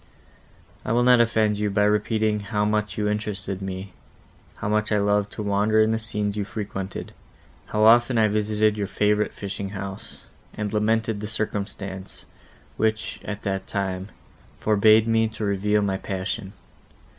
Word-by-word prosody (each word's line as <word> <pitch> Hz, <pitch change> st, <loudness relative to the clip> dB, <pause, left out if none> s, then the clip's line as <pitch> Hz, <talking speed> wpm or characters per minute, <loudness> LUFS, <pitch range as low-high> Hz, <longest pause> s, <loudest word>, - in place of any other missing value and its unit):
I -, -, -1 dB
will 120 Hz, +1 st, +3 dB
not 125 Hz, -1 st, +6 dB
offend 110 Hz, -3 st, +2 dB
you 105 Hz, 0 st, +1 dB
by 100 Hz, +1 st, +2 dB
repeating 105 Hz, +1 st, +1 dB
how 105 Hz, 0 st, -1 dB
much 105 Hz, 0 st, -1 dB
you 105 Hz, -1 st, 0 dB
interested 105 Hz, -2 st, -3 dB
me; 95 Hz, 0 st, -6 dB, 0.6 s
how -, -, -5 dB
much 105 Hz, +1 st, 0 dB
I 105 Hz, -, +3 dB
loved 105 Hz, 0 st, +1 dB
to 105 Hz, -, -4 dB
wander 105 Hz, +2 st, +2 dB
in 110 Hz, 0 st, +4 dB
the 110 Hz, -, 0 dB
scenes 105 Hz, -2 st, -2 dB
you 105 Hz, -, -1 dB
frequented; 100 Hz, -2 st, -5 dB, 0.5 s
how 105 Hz, -, 0 dB
often 120 Hz, +2 st, +6 dB
I 110 Hz, -1 st, +5 dB
visited 105 Hz, 0 st, +1 dB
your 100 Hz, -1 st, -1 dB
favourite 105 Hz, +1 st, +1 dB
fishing 100 Hz, 0 st, -5 dB
house, 95 Hz, -1 st, -7 dB, 0.3 s
and 105 Hz, -1 st, -3 dB
lamented 110 Hz, 0 st, +1 dB
the 105 Hz, -, -4 dB
circumstance, 100 Hz, -3 st, -4 dB, 0.5 s
which, 110 Hz, 0 st, -1 dB
at 105 Hz, -1 st, -6 dB
that 95 Hz, -2 st, -2 dB
time, 95 Hz, -1 st, -3 dB, 0.5 s
forbade 110 Hz, +1 st, +5 dB
me 115 Hz, 0 st, +3 dB
to 110 Hz, -1 st, -5 dB
reveal 105 Hz, +1 st, +1 dB
my 95 Hz, -1 st, 0 dB
passion. 95 Hz, +1 st, -4 dB
105 Hz, 155 wpm, -24 LUFS, 100-110 Hz, 0.6 s, not